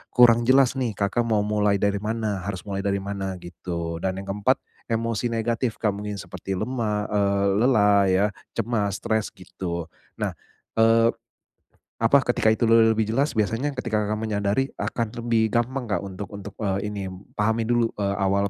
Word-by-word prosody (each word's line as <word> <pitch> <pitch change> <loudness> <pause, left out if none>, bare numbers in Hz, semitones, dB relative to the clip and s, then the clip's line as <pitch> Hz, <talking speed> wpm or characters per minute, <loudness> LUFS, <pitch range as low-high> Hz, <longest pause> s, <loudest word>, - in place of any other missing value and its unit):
kurang 120 -1 +6
jelas 135 0 +4
nih, 115 -5 -1
Kakak 105 +4 0
mau 105 -2 +2
mulai 105 -1 +2
dari 100 0 +1
mana, 110 -1 -2
harus 95 -2 -4
mulai 100 -1 -4
dari 100 -1 -1
mana 95 -1 -3
gitu. 85 -1 -5
Dan 95 +1 -1
yang 100 - -4
keempat, 105 +6 +2 0.3
emosi 115 +1 -1
negatif, 115 +1 -1
Kak, 105 -3 0
mungkin 105 0 -5
seperti 95 +1 -5
lemah, 105 -2 -1
eee, 100 -1 +2 0.2
lelah 105 -6 +5
ya, 95 +2 +3 0.3
cemas 105 -4 0
stres 110 -1 0
gitu. 90 -2 -5 0.3
Nah, - - -2 0.4
eee, 115 +1 +5 0.9
apa, 125 +5 +5
ketika 120 -2 +2
itu 115 - +1
le 115 0 +6
lebih 110 -1 0
jelas, 140 +5 +1
biasanya 115 +7 +1
ketika 110 -4 0
Kakak 105 +1 -1
menyadari 105 +4 0
akan 115 -2 -2
lebih 115 -2 +2
gampang, 125 +2 0
Kak, 100 - 0
untuk 100 0 -6
untuk, 100 -1 -8
eee, 100 0 -1
ini, 100 -2 -4 0.3
pahami 110 +2 +1
dulu, 120 -1 +3
eee, 100 -1 0
awal 100 +1 +2
105 Hz, 170 wpm, -24 LUFS, 100-115 Hz, 0.9 s, kurang